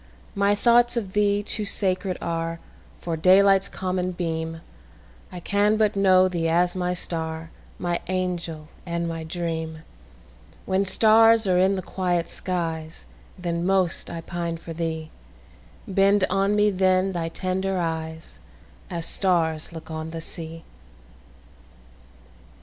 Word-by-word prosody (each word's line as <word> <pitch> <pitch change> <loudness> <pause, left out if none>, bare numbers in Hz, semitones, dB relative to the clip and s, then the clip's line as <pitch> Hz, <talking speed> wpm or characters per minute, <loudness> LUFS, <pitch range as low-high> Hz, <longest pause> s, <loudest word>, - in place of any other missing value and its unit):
My 200 +1 +2
thoughts 240 +2 +4
of 195 -5 -3
thee 205 0 +2
too 210 +1 -1
sacred 190 -2 +1
areFor 165 0 -5
daylight's 195 +2 +5
common 185 -1 -2
beam:I 165 +2 -7
can 205 +4 +2
but 215 -1 +2
know 185 -1 +5
thee 170 -3 -1
as 175 +2 +2
my 180 -1 -1
star, 160 -2 -3 0.3
My 175 -1 -1
angel 175 -4 -3
and 170 -1 -3
my 165 -1 -4
dream; 160 -1 -4 0.8
When 190 +1 +1
stars 225 +2 +5
are 180 -2 +3
in 190 +2 +3
the 185 - -4
quiet 175 -2 -1
skies, 165 - -4 0.3
Then 170 -1 -2
most 185 -2 +1
I 165 - -5
pine 170 -1 -4
for 165 0 -8
thee; 160 -1 -4 0.8
Bend 195 +1 +3
on 195 +2 +2
me 210 0 +3
then 185 0 +2
thy 170 -2 -3
tender 190 +2 -2
eyes, 160 -1 -4 0.5
As 170 -2 -4
stars 165 -5 0
look 165 -1 -9
on 160 0 -5
the 165 0 -6
sea! 165 0 -6
180 Hz, 125 wpm, -24 LUFS, 165-195 Hz, 0.8 s, daylight's